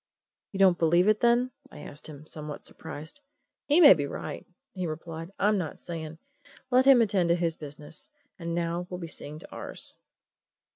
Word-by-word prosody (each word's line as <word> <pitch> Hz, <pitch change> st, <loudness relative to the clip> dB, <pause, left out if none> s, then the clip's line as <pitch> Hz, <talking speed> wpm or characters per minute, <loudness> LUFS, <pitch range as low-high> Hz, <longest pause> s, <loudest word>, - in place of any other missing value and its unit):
"You 195 Hz, -, -6 dB
don't 190 Hz, -2 st, +5 dB
believe 170 Hz, +3 st, +4 dB
it, 215 Hz, 0 st, +4 dB
then?" 240 Hz, +2 st, +3 dB, 0.2 s
I -, -, -11 dB
asked 145 Hz, -, -8 dB
him, 150 Hz, -1 st, -11 dB
somewhat 150 Hz, -1 st, -7 dB
surprised. 155 Hz, -, -9 dB, 0.5 s
"He 300 Hz, +4 st, +5 dB
may 310 Hz, -, +10 dB
be 145 Hz, -5 st, -2 dB
right," -, -, -6 dB, 0.3 s
he 185 Hz, -2 st, -3 dB
replied. 165 Hz, +1 st, -6 dB
"I'm 210 Hz, 0 st, +3 dB
not 160 Hz, -5 st, -4 dB
saying. 160 Hz, -2 st, -6 dB, 0.5 s
Let 255 Hz, +1 st, +5 dB
him 265 Hz, -4 st, +8 dB
attend 190 Hz, -5 st, +1 dB
to 170 Hz, -, +5 dB
his 170 Hz, -2 st, 0 dB
business 150 Hz, -, -9 dB, 0.3 s
and 170 Hz, -1 st, -3 dB
now 170 Hz, +1 st, -2 dB
we'll 180 Hz, -, -5 dB
be 170 Hz, -, -5 dB
seeing 150 Hz, -2 st, -8 dB
to -, -, -13 dB
ours." -, -, -3 dB
170 Hz, 180 wpm, -28 LUFS, 155-200 Hz, 0.5 s, may